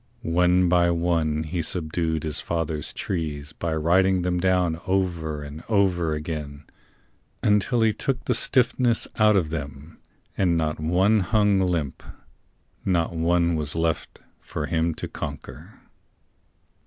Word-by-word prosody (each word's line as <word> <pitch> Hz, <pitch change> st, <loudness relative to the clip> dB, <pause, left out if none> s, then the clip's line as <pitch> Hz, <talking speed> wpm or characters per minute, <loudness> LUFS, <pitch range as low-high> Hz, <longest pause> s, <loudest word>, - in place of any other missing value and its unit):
One 90 Hz, +2 st, +3 dB
by 85 Hz, 0 st, +3 dB
one 85 Hz, -3 st, 0 dB
he 85 Hz, +2 st, -3 dB
subdued 80 Hz, -1 st, -2 dB
his 75 Hz, -3 st, -1 dB
father's 80 Hz, -3 st, -3 dB
trees 75 Hz, -4 st, -4 dB
By 85 Hz, -2 st, -3 dB
riding 90 Hz, +3 st, +2 dB
them 90 Hz, 0 st, 0 dB
down 90 Hz, -3 st, +1 dB
over 85 Hz, -6 st, -1 dB
and 75 Hz, +3 st, -9 dB
over 90 Hz, -7 st, +2 dB
again 75 Hz, -2 st, -6 dB, 0.8 s
Until 105 Hz, +3 st, +2 dB
he 110 Hz, -1 st, +3 dB
took 135 Hz, +2 st, -2 dB
the 125 Hz, -, +2 dB
stiffness 120 Hz, 0 st, +2 dB
out 105 Hz, -1 st, +5 dB
of 80 Hz, -5 st, 0 dB
them, 75 Hz, 0 st, -7 dB, 0.4 s
And 85 Hz, -3 st, +2 dB
not 80 Hz, -1 st, -1 dB
one 95 Hz, +7 st, +3 dB
but 95 Hz, -, -1 dB
hung 105 Hz, -3 st, +3 dB
limp, 85 Hz, -7 st, -1 dB, 0.8 s
not 85 Hz, -3 st, 0 dB
one 85 Hz, +1 st, +2 dB
was 75 Hz, -1 st, -3 dB
left 80 Hz, -1 st, -2 dB, 0.2 s
For 75 Hz, -, -5 dB
him 80 Hz, +1 st, 0 dB
to -, -, -5 dB
conquer. -, -, -8 dB
85 Hz, 135 wpm, -24 LUFS, 80-95 Hz, 0.8 s, out